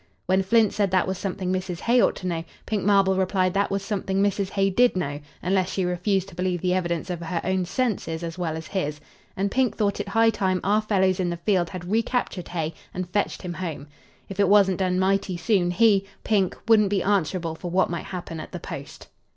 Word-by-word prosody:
When 190 Hz, +1 st, +3 dB
Flint 215 Hz, +2 st, +3 dB
said 200 Hz, -2 st, +1 dB
that 185 Hz, -1 st, +2 dB
was 190 Hz, -1 st, -3 dB
something 185 Hz, -1 st, -2 dB
Mrs. 185 Hz, -2 st, -3 dB
Hay 240 Hz, +1 st, +4 dB
ought -, -, +3 dB
to -, -, -8 dB
know, 165 Hz, -2 st, -2 dB, 0.2 s
Pink 210 Hz, -3 st, -1 dB
Marble 195 Hz, -1 st, +4 dB
replied 185 Hz, -1 st, +1 dB
that 200 Hz, +1 st, +1 dB
was 195 Hz, 0 st, -2 dB
something 195 Hz, -2 st, -1 dB
Mrs. 200 Hz, -1 st, +1 dB
Hay 195 Hz, 0 st, +1 dB
did 245 Hz, +4 st, +4 dB
know, 145 Hz, -5 st, -2 dB, 0.2 s
unless 185 Hz, 0 st, +1 dB
she 190 Hz, -1 st, -1 dB
refused 180 Hz, +2 st, 0 dB
to -, -, -15 dB
believe 180 Hz, 0 st, -1 dB
the 180 Hz, +1 st, 0 dB
evidence 175 Hz, -1 st, -1 dB
of 175 Hz, -, -3 dB
her 170 Hz, 0 st, -2 dB
own 185 Hz, 0 st, 0 dB
senses 180 Hz, -6 st, -2 dB
as 165 Hz, -1 st, -4 dB
well 165 Hz, -3 st, -2 dB
as 160 Hz, -, -7 dB
his, 150 Hz, -4 st, -3 dB, 0.4 s
and 195 Hz, +1 st, 0 dB
Pink 260 Hz, -2 st, +1 dB
thought 205 Hz, -2 st, 0 dB
it 205 Hz, -, -3 dB
high 225 Hz, +3 st, +4 dB
time 190 Hz, -3 st, 0 dB
our 210 Hz, +2 st, +3 dB
fellows 190 Hz, -3 st, +1 dB
in 180 Hz, -2 st, 0 dB
the 170 Hz, -, -3 dB
field 175 Hz, -1 st, +1 dB
had 180 Hz, +1 st, -7 dB
recaptured 225 Hz, -4 st, -1 dB
Hay 165 Hz, -2 st, -3 dB, 0.2 s
and 180 Hz, -1 st, -4 dB
fetched 205 Hz, 0 st, -1 dB
him 175 Hz, -1 st, -4 dB
home. 165 Hz, -5 st, -5 dB, 0.4 s
If 195 Hz, 0 st, -8 dB
it 200 Hz, -2 st, +4 dB
wasn't 200 Hz, -2 st, +5 dB
done 185 Hz, -1 st, +1 dB
mighty 190 Hz, -1 st, +1 dB
soon 175 Hz, 0 st, +2 dB
he, 195 Hz, +1 st, +3 dB, 0.2 s
Pink, 195 Hz, -4 st, +1 dB
wouldn't 215 Hz, -3 st, +5 dB
be 195 Hz, -2 st, +1 dB
answerable 185 Hz, -4 st, 0 dB
for 175 Hz, +2 st, -6 dB
what 185 Hz, +1 st, +2 dB
might 170 Hz, -, -4 dB
happen 175 Hz, -3 st, -6 dB
at 155 Hz, -, -9 dB
the -, -, -4 dB
post. -, -, -8 dB
190 Hz, 225 wpm, -25 LUFS, 180-200 Hz, 0.4 s, wasn't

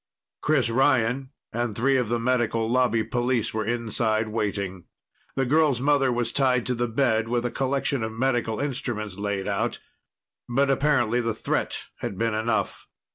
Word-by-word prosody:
Chris 140 Hz, -6 st, +2 dB
Ryan, 130 Hz, 0 st, +2 dB, 0.2 s
and 120 Hz, -2 st, -1 dB
three 135 Hz, +5 st, +2 dB
of 125 Hz, -4 st, +1 dB
the 120 Hz, -, +1 dB
Medical 115 Hz, -2 st, +1 dB
Lobby 120 Hz, -2 st, +2 dB
police 120 Hz, -2 st, 0 dB
were 110 Hz, 0 st, -1 dB
inside, 110 Hz, -1 st, 0 dB
waiting. 100 Hz, -4 st, -3 dB, 0.5 s
The 135 Hz, -, +1 dB
girl's 145 Hz, -1 st, +3 dB
mother 140 Hz, -1 st, +3 dB
was 120 Hz, -1 st, -1 dB
tied 130 Hz, -4 st, +2 dB
to 125 Hz, -, 0 dB
the 120 Hz, 0 st, -1 dB
bed, 115 Hz, -2 st, +1 dB
with 120 Hz, +1 st, 0 dB
a 120 Hz, -, -1 dB
collection 135 Hz, 0 st, -1 dB
of 110 Hz, 0 st, -2 dB
medical 120 Hz, -2 st, 0 dB
instruments 120 Hz, -8 st, -3 dB
laid 100 Hz, -1 st, -2 dB
out, -, -, -1 dB, 0.7 s
but 135 Hz, +3 st, +2 dB
apparently 130 Hz, -4 st, +2 dB
the 115 Hz, -2 st, -1 dB
threat -, -, -2 dB, 0.2 s
had 95 Hz, -, -4 dB
been 115 Hz, +1 st, 0 dB
enough. 110 Hz, +1 st, -1 dB
120 Hz, 160 wpm, -25 LUFS, 110-130 Hz, 0.7 s, girl's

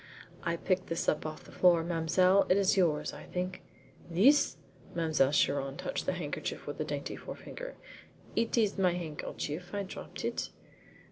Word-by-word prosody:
"I 170 Hz, -1 st, 0 dB
picked 185 Hz, +1 st, 0 dB
this 165 Hz, 0 st, -2 dB
up 155 Hz, -, +1 dB
off 155 Hz, 0 st, -7 dB
the -, -, -14 dB
floor, 175 Hz, -2 st, +5 dB
mademoiselle. 180 Hz, +3 st, +3 dB
It 185 Hz, -, +5 dB
is 195 Hz, -1 st, +4 dB
yours, 170 Hz, -6 st, +2 dB
I -, -, -9 dB
think?" 180 Hz, +1 st, -3 dB, 0.5 s
"This?" 235 Hz, -, +5 dB, 0.4 s
Mademoiselle 155 Hz, -5 st, +3 dB
Chiron 140 Hz, -1 st, +1 dB
touched -, -, -3 dB
the -, -, +2 dB
handkerchief 170 Hz, -5 st, -4 dB
with 145 Hz, +2 st, -4 dB
a -, -, +2 dB
dainty 145 Hz, -2 st, -4 dB
forefinger. -, -, -8 dB, 0.6 s
"It 230 Hz, +1 st, +1 dB
is 210 Hz, -3 st, +2 dB
my 180 Hz, -2 st, +4 dB
handkerchief. 170 Hz, +1 st, -5 dB
I 200 Hz, -, -1 dB
dropped 190 Hz, -, -7 dB
it." -, -, -2 dB
175 Hz, 160 wpm, -31 LUFS, 155-190 Hz, 0.6 s, floor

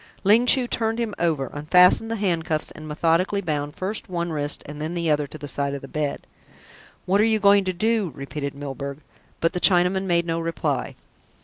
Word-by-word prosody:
Ling 220 Hz, +5 st, +4 dB
Chu 255 Hz, 0 st, +5 dB
turned 225 Hz, -1 st, -1 dB
him 230 Hz, -3 st, -2 dB
over, 155 Hz, -6 st, 0 dB
unfastened 180 Hz, +8 st, +4 dB
the 230 Hz, -, -1 dB
handcuffs, 165 Hz, -6 st, -1 dB
and 155 Hz, 0 st, -10 dB
methodically 165 Hz, +6 st, +1 dB
bound 150 Hz, -5 st, -3 dB
first 195 Hz, +2 st, -4 dB
one 170 Hz, -1 st, -2 dB
wrist 145 Hz, -2 st, -1 dB
and 150 Hz, +1 st, -8 dB
then 160 Hz, +3 st, -3 dB
the 170 Hz, -2 st, 0 dB
other 150 Hz, -1 st, +1 dB
to 155 Hz, -, -10 dB
the 145 Hz, -, -8 dB
side 140 Hz, 0 st, -2 dB
of 140 Hz, -, -8 dB
the -, -, -7 dB
bed. 150 Hz, 0 st, -3 dB, 0.8 s
"What 195 Hz, +3 st, +3 dB
are -, -, +4 dB
you 220 Hz, 0 st, +3 dB
going 200 Hz, -1 st, +4 dB
to 185 Hz, -, 0 dB
do?" 215 Hz, -1 st, 0 dB
repeated 140 Hz, 0 st, -5 dB
Milburgh, 140 Hz, 0 st, -6 dB, 0.4 s
but 165 Hz, +2 st, +1 dB
the 180 Hz, -, -2 dB
Chinaman 185 Hz, +1 st, +4 dB
made 170 Hz, -2 st, +1 dB
no 165 Hz, 0 st, -1 dB
reply. 165 Hz, 0 st, -2 dB
170 Hz, 200 wpm, -23 LUFS, 150-195 Hz, 0.8 s, Chu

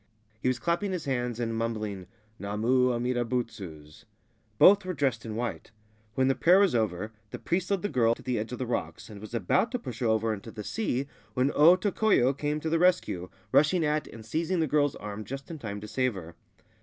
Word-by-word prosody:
He -, -, -1 dB
was 130 Hz, -1 st, +2 dB
clapping 170 Hz, +8 st, -1 dB
his 175 Hz, -4 st, -4 dB
hands 125 Hz, -3 st, -2 dB
and 115 Hz, -1 st, -1 dB
mumbling 110 Hz, -4 st, -3 dB, 0.3 s
'Namu 115 Hz, +6 st, +1 dB
Amida 120 Hz, 0 st, 0 dB
Butsu's.' 100 Hz, -11 st, -5 dB, 0.5 s
Both 205 Hz, +1 st, +7 dB
were 185 Hz, -1 st, -4 dB
dressed 130 Hz, -5 st, -1 dB
in 110 Hz, -, -5 dB
white. 120 Hz, +2 st, -4 dB, 0.5 s
When 130 Hz, 0 st, +2 dB
the 135 Hz, -, +4 dB
prayer 175 Hz, +7 st, +5 dB
was 200 Hz, -2 st, +4 dB
over, 110 Hz, -2 st, -1 dB, 0.2 s
the -, -, -6 dB
priest 180 Hz, +1 st, -2 dB
led 200 Hz, -2 st, 0 dB
the -, -, +1 dB
girl 115 Hz, -, +2 dB
to -, -, -15 dB
the 125 Hz, -3 st, -1 dB
edge 110 Hz, +3 st, -5 dB
of 125 Hz, -, -4 dB
the 130 Hz, -, -3 dB
rocks, 120 Hz, -1 st, -4 dB
and 100 Hz, -1 st, -10 dB
was 110 Hz, +2 st, -7 dB
about 115 Hz, -, +1 dB
to -, -, +1 dB
push 125 Hz, -, -8 dB
her 120 Hz, -, 0 dB
over 110 Hz, 0 st, +1 dB
into 105 Hz, +2 st, -8 dB
the 110 Hz, -1 st, -7 dB
sea, 140 Hz, -, -2 dB, 0.3 s
when 130 Hz, +2 st, +2 dB
O 165 Hz, +5 st, +7 dB
Tokoyo 190 Hz, -, +2 dB
came 150 Hz, +1 st, -2 dB
to 160 Hz, -, -2 dB
the 165 Hz, -, +2 dB
rescue, 175 Hz, -, +1 dB, 0.2 s
rushing 155 Hz, +3 st, +4 dB
at 150 Hz, 0 st, 0 dB
and 110 Hz, -1 st, -11 dB
seizing 165 Hz, +9 st, -1 dB
the 160 Hz, -, +2 dB
girl's 145 Hz, -1 st, +1 dB
arm 105 Hz, +1 st, -6 dB
just 135 Hz, -, -7 dB
in 160 Hz, -, -7 dB
time 105 Hz, -5 st, -5 dB
to 105 Hz, -, -7 dB
save 130 Hz, 0 st, 0 dB
her. 85 Hz, -3 st, -8 dB
125 Hz, 220 wpm, -28 LUFS, 110-155 Hz, 0.5 s, Both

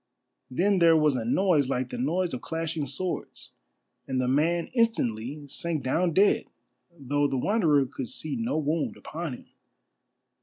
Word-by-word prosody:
Then 185 Hz, +9 st, +2 dB
there 165 Hz, -1 st, +6 dB
was 150 Hz, -3 st, +3 dB
a 120 Hz, -, -2 dB
noise 150 Hz, -, +2 dB
like 125 Hz, -1 st, -1 dB
the -, -, -4 dB
noise 170 Hz, +6 st, 0 dB
of 125 Hz, -, -4 dB
clashing 160 Hz, -2 st, -3 dB
swords, 175 Hz, +7 st, -5 dB, 0.6 s
and 130 Hz, -1 st, -1 dB
the 125 Hz, -, 0 dB
man 160 Hz, +6 st, +1 dB
instantly 145 Hz, -, 0 dB
sank 155 Hz, +2 st, -2 dB
down 170 Hz, +7 st, +1 dB
dead, 200 Hz, +5 st, +4 dB, 0.5 s
though 145 Hz, +1 st, 0 dB
the 135 Hz, -, -2 dB
Wanderer 155 Hz, -, +3 dB
could 125 Hz, -1 st, -6 dB
see 155 Hz, -, -3 dB
no 230 Hz, -6 st, -1 dB
wound 155 Hz, +1 st, -1 dB
upon 160 Hz, -2 st, -5 dB
him. -, -, -15 dB
155 Hz, 155 wpm, -27 LUFS, 130-175 Hz, 0.6 s, there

